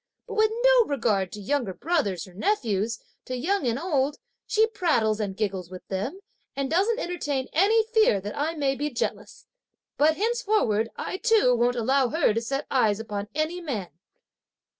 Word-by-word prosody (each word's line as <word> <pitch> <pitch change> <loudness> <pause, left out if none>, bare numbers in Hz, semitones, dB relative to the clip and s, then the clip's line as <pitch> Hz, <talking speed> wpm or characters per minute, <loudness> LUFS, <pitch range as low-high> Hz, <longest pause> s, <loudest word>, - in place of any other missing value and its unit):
But - - -6
with 435 0 +3
no - - +6
regard 215 -9 0
to 210 - -6
younger 215 -2 -1
brothers 280 - -1
or 185 - -15
nephews, 225 - 0 0.3
to 255 - -4
young 340 +2 0
and 235 0 0
old, 295 -3 0 0.3
she 440 +1 +4
prattles 315 - +1
and 195 -3 -3
giggles 195 -5 -2
with 185 0 -10
them, 205 - -3 0.3
and 275 0 -2
doesn't 400 +7 +2
entertain 295 - -3
any 425 +7 +4
fear 435 - +4
that 205 +2 -6
I 315 +3 -1
may 280 -3 +1
be 290 +3 -2
jealous; 300 - -4 0.5
but 310 +2 +4
henceforward 420 - +1
I 370 - -4
too 425 - +4
won't 240 +1 +2
allow 260 +2 +2
her 315 -6 +2
to 230 - -1
set 275 +5 -3
eyes 220 -6 +2
upon 205 -2 -4
any 315 +4 -1
man." 230 - -4
275 Hz, 170 wpm, -26 LUFS, 215-360 Hz, 0.5 s, no